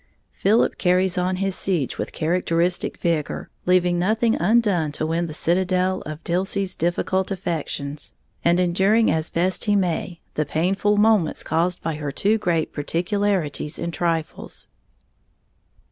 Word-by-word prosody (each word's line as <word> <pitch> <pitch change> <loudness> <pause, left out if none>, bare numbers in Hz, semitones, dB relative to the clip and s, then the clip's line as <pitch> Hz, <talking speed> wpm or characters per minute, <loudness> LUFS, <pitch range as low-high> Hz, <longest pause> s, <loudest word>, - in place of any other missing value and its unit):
_ - - -37 0.3
Philip 215 +4 +2
carries 180 0 +2
on 180 +1 0
his 195 +1 -1
siege 175 -8 -1
with - - -3
characteristic 170 +1 0
vigor, 165 -4 -2 0.2
leaving 180 -1 +3
nothing 220 +5 +2
undone 195 -6 +2
to 155 - -2
win 165 +2 -1
the 155 - -7
citadel 185 +2 +1
of 155 +1 -7
Dilsey's 190 +2 -1
difficult 180 +3 0
affections, 155 -6 -4 0.3
and 170 +1 +3
enduring 190 +6 +3
as 160 0 0
best 180 +2 0
he 205 -1 +3
may 175 -2 -1
the 155 - 0
painful 190 +7 +1
moments 210 -6 +3
caused 175 +2 0
by 160 -2 -2
her 150 -2 -4
too 210 +9 +1
great 170 -5 0
particularity 175 0 -1
in 170 - -3
trifles. 165 -2 -3
180 Hz, 140 wpm, -23 LUFS, 165-195 Hz, 0.3 s, leaving